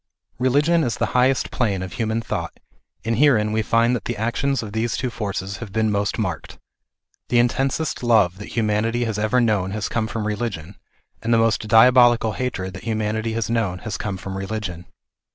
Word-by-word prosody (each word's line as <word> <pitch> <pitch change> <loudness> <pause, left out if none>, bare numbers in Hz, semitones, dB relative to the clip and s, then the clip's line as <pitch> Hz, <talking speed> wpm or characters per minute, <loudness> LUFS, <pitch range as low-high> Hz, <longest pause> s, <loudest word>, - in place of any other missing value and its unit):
Religion 145 +6 +3
is 120 -3 -1
the - - +1
highest 125 +1 +2
plane 100 -7 0
of 95 - -7
human 115 0 -1
thought, - - -4 0.5
and 115 0 0
herein 115 -8 +4
we 110 +1 +1
find 115 +3 +2
that 110 - -5
the - - -3
actions 120 +5 -1
of 105 -2 -8
these 110 +1 -1
two 125 0 -2
forces 100 -3 -4
have 105 -1 -8
been 110 +1 +1
most 100 -1 -1
marked. 90 -8 -4 0.7
The 120 - +2
in 120 0 +5
tensest 135 +5 -1
love 105 -7 +3
that 105 - -9
humanity 115 +2 +1
has 110 -2 -2
ever 110 +4 +2
known 105 -6 +1
has 105 - -2
come 110 -2 -1
from 115 -2 -4
religion, 105 -5 -3 0.5
and 115 - -2
the 115 - +5
most 115 -1 +1
diabolical 120 0 +6
hatred 95 -6 -3
that 95 - -9
humanity 110 0 -1
has 115 -2 -1
known 115 -6 -1
has 110 - -3
come 100 -3 -4
from 95 +1 -7
religion. 95 -4 -5
110 Hz, 190 wpm, -22 LUFS, 105-120 Hz, 0.7 s, diabolical